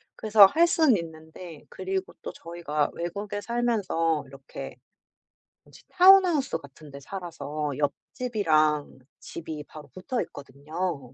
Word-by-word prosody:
그래서 215 -2 +7
할 320 - +4
수는 315 -9 +4
있는데 160 0 -10
그리고 190 0 -4
또 - - -6
저희가 165 -3 -3
외국에 200 +4 -5
살면서 205 -10 0
이렇게 135 0 -10 0.9
뭐지? - - -18
타운하우스 365 - +5
같은 145 0 -15
데 140 - -9
살아서 155 -3 -5
옆집이랑 155 - 0 0.2
집이 160 -2 -7
바로 150 -2 -12
붙어 235 +6 -3
있거든요. 145 0 -6
170 Hz, 280 characters per minute, -26 LUFS, 150-210 Hz, 0.9 s, 그래서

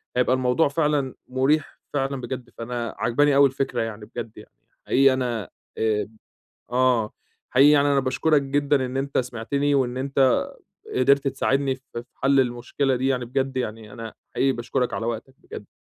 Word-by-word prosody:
هيبقى 125 +1 +3
الموضوع 130 +5 +2
فعلًا 145 -2 0
مريح، 135 +4 0
فعلًا 135 -1 -1
بجد. 125 -1 -6
فأنا 120 0 -4
عاجباني 145 +4 +2
أوي 140 0 +7
الفكرة 135 +1 -2
يعني 110 -2 -5
بجد، 115 -1 -8
يعني 105 - -13 0.4
حقيقي 135 0 +5
أنا 120 -6 -2 0.3
آآ 110 -2 0 0.6
آه، 125 -3 +2 0.4
حقيقي 135 +3 +6
يعني 145 -1 +4
أنا 140 -1 +3
باشكرك 140 +3 +2
جدًا 140 0 +1
إن 130 +1 -4
أنت 140 +1 -2
سمعتني، 130 +4 0
وإن 125 -2 0
أنت 135 -1 +2 0.5
قدِرت 140 +2 +3
تساعدني 135 0 0
ف 130 - -24 0.2
في 120 - -5
حل 135 0 +3
المشكلة 130 +2 0
دي، 130 +2 0
يعني 125 -2 0
بجد 130 +2 -2
يعني 110 -3 -4
أنا 115 -1 -8 0.2
حقيقي 135 - +3
باشكرك 125 +1 -2
على 115 - -2
وقتك 120 +3 -4
بجد. - - -10
130 Hz, 165 wpm, -24 LUFS, 120-140 Hz, 0.6 s, أوي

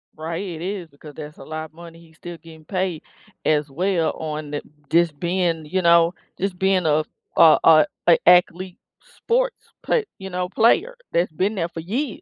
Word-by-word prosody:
Right, 165 +3 -4
it 170 -4 -6
is 185 -2 -4
because 145 +1 -14
that's 150 0 -9
a - - -11
lotta 155 +1 -7
money 170 0 -12
he's 160 -1 -20
still 175 -1 -9
getting 160 -2 -15
paid 185 -3 -2 0.4
as 150 -1 +1
well 170 +3 0
on 155 -1 -5
the 145 0 -4 0.3
just 165 -3 +2
being, 170 -3 -1
you 185 +3 -1
know, 170 +1 +5 0.3
just 190 -2 -2
being 190 -3 +2
a 155 +1 +2 0.3
a 160 -2 +7
a 155 -2 +7 0.2
a 170 - +7
athlete 180 +3 +3 0.2
sports, - - -2 0.2
but, 455 -3 +1
you 190 -1 -8
know, 180 0 -2
player 350 - +2 0.2
that's 170 0 +1
been 190 +7 -1
there 170 -4 -2
for 165 - -7
years, 230 - -3
170 Hz, 180 wpm, -22 LUFS, 155-185 Hz, 0.4 s, a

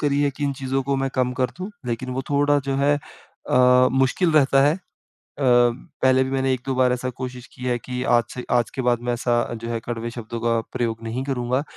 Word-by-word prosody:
करी 145 -1 +1
हैं 145 - +2
कि 145 - -2
इन 140 - 0
चीज़ों 135 +1 -1
को 140 +1 -1
मैं 135 0 0
कम 125 -1 +1
कर 130 - +2
दूँ 185 +3 -5 0.2
लेकिन 120 +2 -3
वो 130 +1 -2
थोड़ा 145 0 +3
जो 135 - 0
है 140 +1 +3 0.6
अ, 125 0 +5
मुश्किल 135 +6 +2
रहता 135 -2 +4
है। 145 +3 +4
अ, 190 - -16 0.6
पहले 130 +2 +3
भी 130 - -4
मैंने 135 0 +1
एक-दो 130 +1 -3
बार 125 -1 +3
ऐसा 125 +1 -2
कोशिश 125 -1 -6
किया 125 -1 -3
है 120 - +1
कि 125 0 -3
आज 120 - +4
से 125 - -6
आज 120 -1 +2
के 130 - -1
बाद 120 -1 +3
मैं - - +2
ऐसा 120 0 0 0.3
जो 115 - -5
है 115 -1 -2
कड़वे 120 -1 -4
शब्दों 115 0 -6
का 115 -1 +2
प्रयोग 115 -3 -2
नहीं 115 +4 -3
करूँगा। 130 -1 -1
130 Hz, 230 wpm, -23 LUFS, 120-135 Hz, 0.6 s, अ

